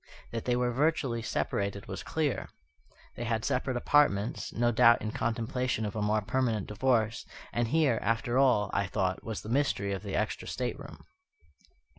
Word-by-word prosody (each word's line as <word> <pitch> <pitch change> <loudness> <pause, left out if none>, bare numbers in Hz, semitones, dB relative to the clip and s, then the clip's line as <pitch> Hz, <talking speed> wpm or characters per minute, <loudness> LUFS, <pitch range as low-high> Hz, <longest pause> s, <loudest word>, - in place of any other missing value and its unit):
That 115 -1 -4
they 125 - +2
were 125 0 +1
virtually 135 -3 +1
separated 100 -3 -2
was - - -5
clear. 155 -4 -2 0.7
They - - -5
had 110 -1 -1
separate 130 0 0
apartments, 120 -6 +2
no 120 +1 +1
doubt 115 +1 +6
in 110 - -4
contemplation 115 +1 -1
of 105 - -4
a 105 - -2
more 105 0 +1
permanent 110 -1 0
divorce; 115 0 +1 0.3
and 120 -1 +1
here, 140 -3 +2
after 115 +3 +1
all, 125 -7 +3
I 100 0 +1
thought, 95 -2 -1
was 110 -2 -5
the 110 - -8
mystery 115 -7 +1
of 95 - -4
the 100 -2 -4
extra 105 0 -2
stateroom. 140 +3 -5
115 Hz, 165 wpm, -30 LUFS, 105-125 Hz, 0.7 s, doubt